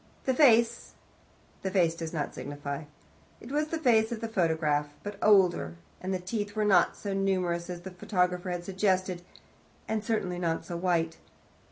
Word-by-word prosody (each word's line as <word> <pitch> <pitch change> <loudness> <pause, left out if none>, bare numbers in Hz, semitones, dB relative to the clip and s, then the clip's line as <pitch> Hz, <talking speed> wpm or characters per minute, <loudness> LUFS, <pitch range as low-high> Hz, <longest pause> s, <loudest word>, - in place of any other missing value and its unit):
The 260 - +2
face 235 -5 +4 0.7
the 190 - -2
face 180 -4 +3
does 165 -1 -5
not 150 -4 -3
signify. 145 +1 -5 0.5
It 235 - -10
was 300 +1 +1
the 325 - -2
face 235 -6 +3
of 235 - -3
the 230 - -3
photograph, 160 -7 +1
but 205 -1 -6
older, 180 - +4 0.3
and 185 - -3
the 190 - +1
teeth 205 +3 -4
were 215 -1 +1
not 190 -4 +4
so 200 -1 -4
numerous 185 -3 0
as 175 -1 -5
the 190 +1 -8
photographer 180 -1 -1
had 175 -1 -3
suggested, 185 -1 0 0.7
and 220 -1 -1
certainly 190 -5 -1
not 165 -2 -1
so 175 - -5
white. 170 -2 0
185 Hz, 170 wpm, -29 LUFS, 170-210 Hz, 0.7 s, face